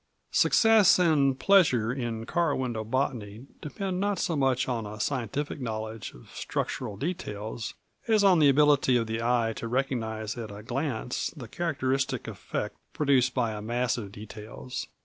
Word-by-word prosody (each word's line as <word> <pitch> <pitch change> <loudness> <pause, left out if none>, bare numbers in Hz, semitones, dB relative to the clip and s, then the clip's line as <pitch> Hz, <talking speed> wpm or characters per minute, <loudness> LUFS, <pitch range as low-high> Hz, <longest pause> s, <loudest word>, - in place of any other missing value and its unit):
Success 220 -4 +5
and 145 -7 +3
pleasure 130 - +4
in 120 -4 -3
car 170 +1 +1
window 120 -4 -2
botany 115 -2 -2 0.2
depend 185 +4 -3
not 200 0 0
so 170 - 0
much 135 -2 +1
on 115 -4 -2
a 105 +1 -8
scientific 140 +4 -2
knowledge 110 -2 -5
of 60 - -16
structural 100 - -3
details 110 - -4 0.3
as 215 -2 +4
on 190 -4 +6
the 145 -2 +6
ability 140 -2 +4
of 115 - 0
the 110 0 -3
eye 115 -1 +1
to 115 - -5
recognize 115 -4 -2
at 110 -2 -5
a 105 +1 -9
glance 125 0 -2
the 125 -5 -7
characteristic 135 -3 -1
effect - - -4 0.2
produced 130 -4 +2
by 120 -4 +1
a 105 - -5
mass 120 +3 0
of 105 -5 -6
details. 110 +4 -7
125 Hz, 155 wpm, -28 LUFS, 110-145 Hz, 0.3 s, on